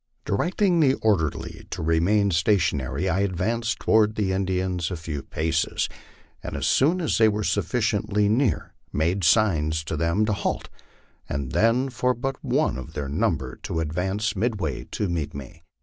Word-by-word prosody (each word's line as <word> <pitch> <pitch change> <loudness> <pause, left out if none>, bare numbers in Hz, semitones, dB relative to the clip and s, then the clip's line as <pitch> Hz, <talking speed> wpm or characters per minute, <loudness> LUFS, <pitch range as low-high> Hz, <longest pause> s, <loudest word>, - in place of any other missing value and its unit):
Directing 175 - +1
the 135 -4 +4
orderly 90 -9 -1
to - - -4
remain 95 +6 +2
stationary, 80 - +1
I 90 - +1
advanced 110 +4 0
toward 110 -1 +3
the 100 -3 0
Indians 95 -2 -1
a 90 - -3
few 80 -3 -5
paces, 80 +2 -1 0.5
and - - -5
as - - -2
soon 160 +7 +3
as 160 - 0
they 110 - +6
were 105 0 -1
sufficiently 105 +1 +1
near 115 +2 +1 0.2
made 85 +5 0
signs 80 -5 +3
to 80 - -4
them 85 +7 +1
to 105 - 0
halt, 100 - -2 0.6
and 70 -2 -3
then 120 +5 +2
for 125 +1 0
but 135 +2 -4
one - - +1
of 75 +4 -9
their 70 -3 -4
number 70 -3 -1
to 80 - -4
advance 95 +7 -1
midway 100 - -2
and 105 - 0
meet 75 -4 -3
me. 70 +4 -9
95 Hz, 160 wpm, -25 LUFS, 80-110 Hz, 0.6 s, they